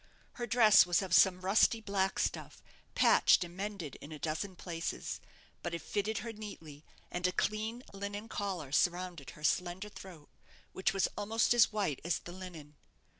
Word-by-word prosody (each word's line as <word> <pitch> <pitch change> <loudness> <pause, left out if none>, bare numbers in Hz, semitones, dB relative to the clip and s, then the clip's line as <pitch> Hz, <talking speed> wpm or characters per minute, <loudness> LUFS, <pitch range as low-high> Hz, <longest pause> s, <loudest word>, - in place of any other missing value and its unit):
Her 240 0 -5
dress 220 -4 +7
was 175 +2 +2
of 185 -3 -4
some 185 +1 +5
rusty 205 +4 +4
black 200 -3 -1
stuff, - - -3 0.3
patched - - +5
and 175 0 -10
mended 195 -7 -5
in 145 - -10
a 155 - -6
dozen 165 +6 -3
places; 165 -2 -4 0.4
but 170 0 -3
it 170 - -5
fitted 210 +1 -2
her 230 - -5
neatly, 165 -9 -10 0.3
and 180 +1 0
a - - 0
clean 220 +5 -2
linen 200 +2 -5
collar 190 -10 -4
surrounded 175 -1 0
her 150 - -13
slender 180 +6 0
throat, 175 -7 -12 0.4
which 190 +3 +1
was 195 -1 +1
almost 220 +3 +2
as 240 -2 +5
white 200 -10 -1
as 170 0 0
the 175 - -10
linen. 170 -5 -10
190 Hz, 170 wpm, -33 LUFS, 170-210 Hz, 0.4 s, dress